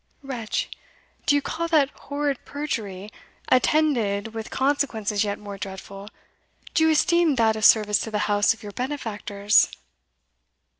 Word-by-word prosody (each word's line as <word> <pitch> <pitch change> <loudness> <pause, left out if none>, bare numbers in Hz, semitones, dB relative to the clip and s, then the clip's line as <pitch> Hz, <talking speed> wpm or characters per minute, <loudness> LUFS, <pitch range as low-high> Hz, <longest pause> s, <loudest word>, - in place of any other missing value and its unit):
"Wretch! 245 -5 -3 0.6
do 290 - +5
you 285 - +1
call 335 +3 -3
that 300 -4 +3
horrid 285 -2 -3
perjury, 215 -9 -5 0.4
attended 235 -7 +2
with 225 0 -6
consequences 230 -7 0
yet 205 -1 -2
more 205 -1 -9
dreadful 195 +1 -8 0.6
do 320 - +3
you - - +4
esteem 335 0 +3
that 225 -2 +3
a 220 - -5
service 210 -1 +5
to - - -4
the 215 - -2
house 205 +1 +3
of 225 - -5
your 205 - -7
benefactors?" 210 -5 +1
225 Hz, 140 wpm, -24 LUFS, 205-285 Hz, 0.6 s, do